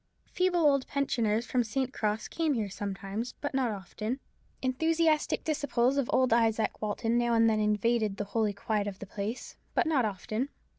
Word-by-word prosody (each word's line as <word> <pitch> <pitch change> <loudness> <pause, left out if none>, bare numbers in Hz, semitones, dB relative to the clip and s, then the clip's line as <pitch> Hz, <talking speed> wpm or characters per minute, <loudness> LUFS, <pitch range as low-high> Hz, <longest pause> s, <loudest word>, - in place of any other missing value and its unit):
Feeble 365 -1 +2
old 280 -4 +3
pensioners 235 -5 0
from 250 -1 +1
St. 260 +4 -2
Cross 215 +1 -1
came 320 -4 0
here 210 -4 -2
sometimes, 200 +4 -4
but 290 - -3
not 260 -2 +1
often. 215 +5 -4 0.4
Enthusiastic 315 +4 +2
disciples 275 -4 +1
of 275 -4 0
old 255 -1 +3
Izaak 225 -2 +3
Walton 225 +2 0
now 240 -1 +2
and 230 0 +5
then 220 -1 +2
invaded 210 0 +1
the - - -1
holy 210 +1 0
quiet 205 0 -1
of 195 -2 -5
the 200 - -8
place: 205 +4 -5 0.2
but - - +3
not 305 -6 +2
often. 215 +5 -2
230 Hz, 175 wpm, -30 LUFS, 210-270 Hz, 0.4 s, and